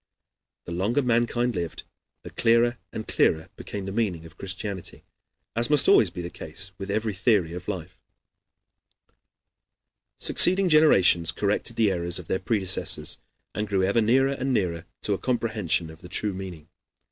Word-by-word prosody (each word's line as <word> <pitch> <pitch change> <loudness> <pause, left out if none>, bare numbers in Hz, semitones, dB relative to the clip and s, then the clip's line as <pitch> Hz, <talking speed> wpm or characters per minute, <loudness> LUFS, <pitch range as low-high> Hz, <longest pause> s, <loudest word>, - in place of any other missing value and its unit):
The - - -8
longer 105 +11 0
mankind 120 0 +1
lived, 85 -4 -4 0.4
the - - -9
clearer 120 +1 +2
and 110 - -6
clearer 80 0 +1
became 100 -2 -7
the 95 - -5
meaning 95 -7 -2
of 80 - -14
Christianity, 95 -1 -6 0.5
as 115 +1 +2
must 150 -2 +6
always 105 - +6
be 90 +1 -7
the 85 - -6
case 95 +6 -3
with 95 0 -6
every 110 +1 -1
theory 95 -4 +1
of 90 +1 -8
life. 90 -3 -6 2.2
Succeeding 185 +1 +4
generations 95 - +5
corrected 105 +3 -1
the 110 -3 +3
errors 85 -1 -1
of 90 - -6
their 95 - -1
predecessors, 95 -5 -2 0.3
and 105 0 -3
grew 95 -2 0
ever 100 +5 +2
nearer 130 +5 +3
and 135 0 -2
nearer 90 -7 -1
to 105 - +1
a 95 - -2
comprehension 110 -10 -1
of 80 - -15
the 90 - -11
true 105 +3 -1
meaning. 90 -5 -8
100 Hz, 160 wpm, -25 LUFS, 90-115 Hz, 2.2 s, must